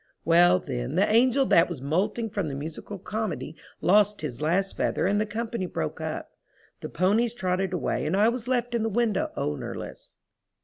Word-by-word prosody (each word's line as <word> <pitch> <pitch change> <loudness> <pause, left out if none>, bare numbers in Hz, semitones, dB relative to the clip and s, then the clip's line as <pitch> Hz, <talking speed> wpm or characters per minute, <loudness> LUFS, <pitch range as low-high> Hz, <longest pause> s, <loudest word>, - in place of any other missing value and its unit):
Well, 175 +2 +6
then 130 -4 -4
the 195 +3 +3
angel 255 +4 +4
that 170 -6 +4
was 170 -6 -5
molting 185 - -1
for 200 - -1
the 150 -6 -3
musical 160 +7 -6
comedy 205 -4 -4 0.3
lost 205 +2 +4
his 150 -4 -5
last 185 +5 0
feather - - 0
and 205 +2 +2
the 215 - -1
company 225 -3 -3
broke 80 - -4
up. - - -5 0.5
The - - -6
ponies 220 +7 +1
trotted 185 -3 -1
away 180 -4 -1
and 175 +5 0
I 210 +2 +5
was 235 0 -1
left 245 -1 0
in 235 - +1
the 225 - 0
window 220 -2 0
ownerless. 75 0 -5
195 Hz, 180 wpm, -26 LUFS, 165-225 Hz, 0.5 s, Well